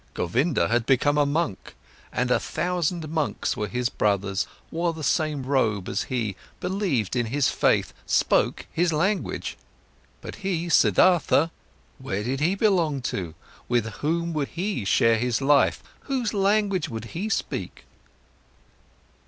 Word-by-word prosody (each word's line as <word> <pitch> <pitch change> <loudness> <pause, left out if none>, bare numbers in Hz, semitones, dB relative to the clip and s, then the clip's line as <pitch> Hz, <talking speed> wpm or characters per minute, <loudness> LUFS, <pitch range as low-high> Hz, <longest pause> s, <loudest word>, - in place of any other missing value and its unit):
Govinda 120 - +1
had 115 0 0
become 140 +2 +3
a 145 -1 +3
monk, 145 - -2 0.4
and 125 0 -1
a - - +4
thousand 175 -2 -2
monks 155 -1 -1
were 105 - -2
his 125 +3 -1
brothers, 100 -3 0 0.2
wore 170 +1 0
the 160 -1 -7
same 155 -3 0
robe 110 -8 0
as - - -2
he, 115 -6 -2 0.2
believed 180 - -1
in 120 -2 0
his 140 +4 +1
faith, - - +1
spoke - - +2
his 175 0 +1
language. 190 +7 -1 0.6
But - - -8
he, 175 -4 -2
Siddhartha, 165 -2 +4 0.5
where 100 +2 -3
did 130 +4 -2
he 170 +6 +2
belong 175 - +1
to? 85 -4 -4 0.3
With 120 -2 +2
whom 170 +2 -1
would 150 -3 -1
he 180 - -3
share 115 +3 +3
his 120 -1 0
life? 140 0 +3 0.2
Whose 255 -5 -1
language 200 -1 +1
would 115 -1 -5
he 200 +6 -3
speak? - - -3
145 Hz, 140 wpm, -25 LUFS, 120-175 Hz, 0.6 s, a